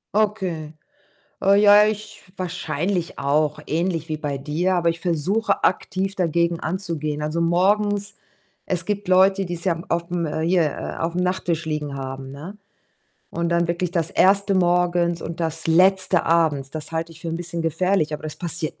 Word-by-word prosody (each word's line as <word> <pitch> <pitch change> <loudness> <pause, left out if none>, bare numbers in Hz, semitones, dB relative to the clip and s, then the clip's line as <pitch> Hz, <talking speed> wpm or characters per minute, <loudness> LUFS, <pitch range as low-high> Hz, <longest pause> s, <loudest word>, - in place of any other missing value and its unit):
Okay. 190 -8 -1 0.7
Oh 195 0 +4
ja, 205 +1 +7
ich 215 0 -4
wahrscheinlich 175 0 -2
auch 150 +2 +1
ähnlich 165 0 -1
wie 155 - -2
bei 145 -2 -3
dir, 160 +7 -1
aber 170 -1 +2
ich 165 - -3
versuche, 190 +6 0
aktiv 190 +1 0
dagegen 170 -1 +1
anzugehen. 160 -4 -3
Also, 155 +2 -2
morgens 200 +4 +1 0.5
es 180 -2 -1
gibt 205 0 -3
Leute, 190 +1 +4
die's 175 -1 -4
ja 185 -3 +2
m 165 +3 -8
aufm, 170 0 -1
äh 155 +1 -3
hier, 175 0 +3
äh, - - -5
aufm 170 +2 -1
Nachttisch 175 -2 -1
liegen 150 -3 -3
haben, 135 0 -6
ne, 165 +9 -9 0.7
und 170 0 -2
dann 170 0 +1
wirklich 175 0 -1
das 165 -3 0
1. 200 +1 +3
morgens 175 -1 +2
und 170 +1 -6
das 165 0 -2
Letzte 185 +1 +4
abends. 155 -5 +2
Das 155 0 -6
halte 165 0 -3
ich 165 - -14
für 170 - -5
'n 165 - -2
bisschen 170 -1 -4
gefährlich, 165 0 +1
aber 150 - -5
das 155 - -5
passiert 170 -2 -3
170 Hz, 170 wpm, -22 LUFS, 160-185 Hz, 0.7 s, ja